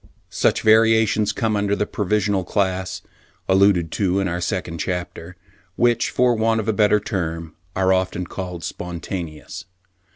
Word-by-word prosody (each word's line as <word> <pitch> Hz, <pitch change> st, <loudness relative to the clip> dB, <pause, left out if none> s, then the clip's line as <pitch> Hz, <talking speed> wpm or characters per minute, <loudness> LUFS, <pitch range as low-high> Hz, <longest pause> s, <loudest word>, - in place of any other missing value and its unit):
Such -, -, +1 dB
variations 110 Hz, -1 st, +4 dB
come 110 Hz, -2 st, -1 dB
under 100 Hz, 0 st, +1 dB
the 105 Hz, -, -1 dB
provisional 100 Hz, -1 st, 0 dB
class, 95 Hz, -1 st, -2 dB, 0.4 s
alluded 95 Hz, -4 st, +3 dB
to 95 Hz, -1 st, 0 dB
in 95 Hz, -, 0 dB
our 85 Hz, 0 st, -3 dB
second 85 Hz, -1 st, -3 dB
chapter, 90 Hz, -1 st, -4 dB, 0.4 s
which 120 Hz, 0 st, +2 dB
for 125 Hz, -1 st, +2 dB
want 110 Hz, 0 st, +1 dB
of 110 Hz, -, -4 dB
a 110 Hz, -, +2 dB
better 105 Hz, 0 st, +3 dB
term 85 Hz, -6 st, -4 dB, 0.2 s
are 95 Hz, 0 st, +3 dB
often 95 Hz, -1 st, -1 dB
called 90 Hz, -2 st, -6 dB
spontaneous. 85 Hz, -2 st, -6 dB
95 Hz, 140 wpm, -21 LUFS, 90-105 Hz, 0.4 s, variations